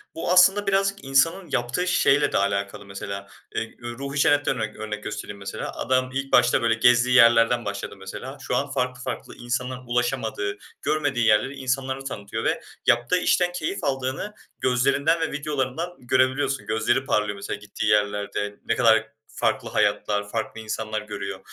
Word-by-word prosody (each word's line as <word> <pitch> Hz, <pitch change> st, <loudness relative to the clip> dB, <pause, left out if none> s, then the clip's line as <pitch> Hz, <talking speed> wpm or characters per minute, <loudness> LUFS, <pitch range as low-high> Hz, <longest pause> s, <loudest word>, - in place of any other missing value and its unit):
Bu, 165 Hz, -, -2 dB
aslında 195 Hz, +3 st, +5 dB
birazcık 195 Hz, -1 st, +1 dB
insanın 165 Hz, +8 st, +2 dB
yaptığı 135 Hz, +8 st, -1 dB
şeyle 145 Hz, -5 st, +3 dB
de -, -, +1 dB
alakalı 100 Hz, 0 st, -1 dB
mesela. 100 Hz, 0 st, -6 dB, 0.3 s
Eee, 115 Hz, -, -3 dB
üüü, 120 Hz, 0 st, -7 dB
Ruhi 140 Hz, +1 st, -4 dB
Çenet'ten 145 Hz, -2 st, +3 dB
örnek 110 Hz, -1 st, -3 dB
örnek 105 Hz, -1 st, -5 dB
göstereyim 105 Hz, -1 st, -6 dB
mesela: 100 Hz, -, -5 dB
Adam 130 Hz, +1 st, +1 dB
ilk 135 Hz, 0 st, -3 dB
başta 120 Hz, -, +5 dB
böyle 115 Hz, -1 st, +3 dB
gezdiği 125 Hz, +2 st, +4 dB
yerlerden 120 Hz, -1 st, +5 dB
başladı 100 Hz, 0 st, -4 dB
mesela, 125 Hz, +8 st, -8 dB
şu -, -, -2 dB
an 140 Hz, 0 st, -1 dB
farklı 125 Hz, -1 st, -2 dB
farklı, 130 Hz, -, -5 dB
insanların 125 Hz, +1 st, -4 dB
ulaşamadığı, 120 Hz, -4 st, -1 dB, 0.2 s
görmediği 145 Hz, -5 st, 0 dB
yerleri 110 Hz, +6 st, +3 dB
insanlara 135 Hz, 0 st, -2 dB
tanıtıyor 100 Hz, -6 st, -5 dB
ve -, -, 0 dB, 0.2 s
yaptığı 120 Hz, +8 st, +3 dB
işten 180 Hz, 0 st, +2 dB
keyif 175 Hz, +2 st, -3 dB
aldığını 135 Hz, +8 st, -2 dB, 0.3 s
gözlerinden 140 Hz, +6 st, +2 dB
ve 160 Hz, -, -1 dB
videolarından 150 Hz, +3 st, -2 dB
görebiliyorsun. 130 Hz, +2 st, +1 dB
Gözleri 120 Hz, +4 st, +1 dB
parlıyor 105 Hz, -5 st, 0 dB
mesela 100 Hz, +1 st, -5 dB
gittiği 105 Hz, -1 st, -5 dB
yerlerde, 105 Hz, -1 st, 0 dB
ne -, -, +1 dB
kadar 110 Hz, 0 st, +3 dB, 0.2 s
farklı -, -, 0 dB
hayatlar, 105 Hz, -1 st, 0 dB
farklı 110 Hz, 0 st, -4 dB
insanlar 110 Hz, 0 st, -3 dB
görüyor 105 Hz, -2 st, -6 dB
125 Hz, 155 wpm, -24 LUFS, 110-140 Hz, 0.3 s, aslında